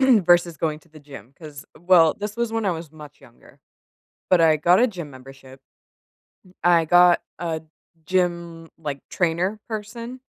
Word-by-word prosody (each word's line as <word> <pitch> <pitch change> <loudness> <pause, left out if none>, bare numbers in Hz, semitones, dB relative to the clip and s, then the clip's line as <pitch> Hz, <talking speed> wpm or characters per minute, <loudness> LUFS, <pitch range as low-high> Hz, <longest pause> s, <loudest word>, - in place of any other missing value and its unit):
versus 175 - +3
going 155 0 -2
to - - -27
the 155 -1 -15
gym 140 -5 -13
'cause 150 -3 -11
well, 170 -2 +4
this 210 +2 -6
was 235 -1 -2
when 225 -2 -2
I 190 - +2
was 165 -2 -8
much 150 -3 -14
younger. 120 -3 -20 0.7
But 185 -2 +4
I 160 -1 +5
got 175 +6 +3
a 250 - +4
gym 175 -8 -8
membership. 135 0 -14 0.9
M 185 - -21
I 170 -1 +4
got 175 +1 +5 0.2
a 165 -2 -3 0.4
gym, 170 -2 -2
like, 145 -4 -6
trainer 180 +4 -1
person 230 +3 -7
170 Hz, 165 wpm, -22 LUFS, 155-185 Hz, 0.9 s, I